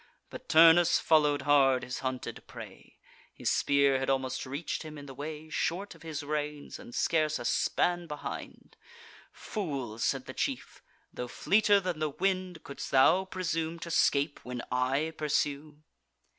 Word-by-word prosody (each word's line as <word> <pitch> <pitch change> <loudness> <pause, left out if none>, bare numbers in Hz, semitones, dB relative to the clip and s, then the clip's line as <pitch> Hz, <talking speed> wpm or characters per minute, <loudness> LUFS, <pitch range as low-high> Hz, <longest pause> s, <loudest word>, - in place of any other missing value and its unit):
But - - -10
Turnus 165 +2 +7
follow'd 150 -3 +3
hard 135 -3 +4
his 125 - -5
hunted 130 -1 -5
prey - - -12 0.4
(His - - -1
spear 140 -1 +3
had 135 - -2
almost 130 -1 -1
reach'd 140 +6 -4
him 155 -1 -8
in 145 - -9
the 135 - -9
way, 150 +3 -7
Short 180 +5 -2
of - - -18
his 155 -2 -5
reins, 150 0 -4
and 120 - -11
scarce 155 -2 +1
a 120 - -7
span 175 +6 +1
behind) 150 -2 -8 0.5
"Fool!" 140 - -5
said - - 0
the - - -8
chief, - - -4 0.3
"tho' 125 - -5
fleeter 205 - +3
than 180 -4 -3
the 155 -1 0
wind, 185 +2 -2
Couldst 140 - -7
thou 160 +8 +5
presume 165 -3 -3
to 170 0 -7
scape, 145 -2 +2
when 125 -1 -5
I 130 +5 0
pursue?" 150 0 -2
150 Hz, 155 wpm, -30 LUFS, 135-165 Hz, 0.5 s, Turnus